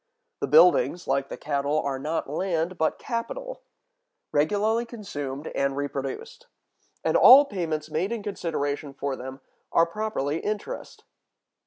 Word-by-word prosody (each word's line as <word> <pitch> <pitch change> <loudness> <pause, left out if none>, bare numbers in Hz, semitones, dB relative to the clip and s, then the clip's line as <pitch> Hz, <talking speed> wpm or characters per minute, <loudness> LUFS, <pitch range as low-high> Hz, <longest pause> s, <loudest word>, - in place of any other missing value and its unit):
The - - -1
buildings, 475 - +5
like 135 0 0
the - - -6
cattle, 145 0 -1
are 135 -2 -2
not 155 +4 -2
land, 170 +3 -1
but 160 - +1
capital, - - -5 0.7
regularly 205 +10 +2
consumed 155 - -6
and 140 0 0
reproduced; 145 - -5 0.6
and - - +1
all 275 +3 +9
payments 160 - -3
made 170 +7 -1
in 230 -3 -3
consideration 145 -7 -3
for 140 0 -3
them 130 +1 -8 0.3
are 165 - +5
properly 170 -6 -2
interest. 215 - -5
160 Hz, 130 wpm, -26 LUFS, 140-215 Hz, 0.7 s, all